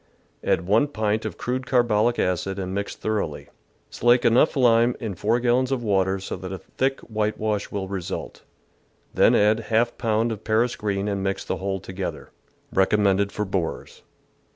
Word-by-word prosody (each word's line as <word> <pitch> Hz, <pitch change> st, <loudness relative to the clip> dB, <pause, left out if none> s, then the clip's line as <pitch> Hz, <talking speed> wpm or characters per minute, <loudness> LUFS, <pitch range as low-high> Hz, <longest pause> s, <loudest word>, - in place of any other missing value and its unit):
Add 85 Hz, -, +1 dB
1 110 Hz, +9 st, +3 dB
pint 110 Hz, -5 st, -1 dB
of -, -, -5 dB
crude 130 Hz, +1 st, -3 dB
carbolic 120 Hz, -2 st, +2 dB
acid 90 Hz, +2 st, -1 dB
and 95 Hz, -1 st, -4 dB
mix 100 Hz, +1 st, -3 dB
thor 110 Hz, -1 st, -1 dB
oughly. 75 Hz, -2 st, -6 dB, 0.4 s
Slake 120 Hz, +1 st, +3 dB
enough 125 Hz, +6 st, +4 dB
lime 120 Hz, -1 st, +4 dB
in 110 Hz, -4 st, -4 dB
4 110 Hz, +6 st, +1 dB
gallons 125 Hz, +2 st, +2 dB
of 130 Hz, -3 st, -1 dB
water 95 Hz, -2 st, +1 dB
so 95 Hz, -, -5 dB
that 95 Hz, +1 st, -7 dB
a 95 Hz, -, -4 dB
thick 135 Hz, +7 st, -2 dB
whitewash 105 Hz, -1 st, -2 dB
will 100 Hz, -2 st, -4 dB
result, 95 Hz, -3 st, -5 dB, 0.7 s
then -, -, +5 dB
add 110 Hz, +2 st, +3 dB, 0.3 s
% -, -, -27 dB
pound 115 Hz, 0 st, +1 dB
of 110 Hz, -1 st, -6 dB
Paris 115 Hz, +2 st, +1 dB
green 100 Hz, -1 st, -2 dB
and 100 Hz, -1 st, -1 dB
mix 95 Hz, 0 st, -2 dB
the -, -, -2 dB
whole 95 Hz, 0 st, -2 dB
together. 95 Hz, 0 st, -6 dB, 0.4 s
Recommended 100 Hz, 0 st, +2 dB
for 105 Hz, -, -2 dB
borers. 95 Hz, -4 st, -4 dB
105 Hz, 170 wpm, -24 LUFS, 95-120 Hz, 0.7 s, then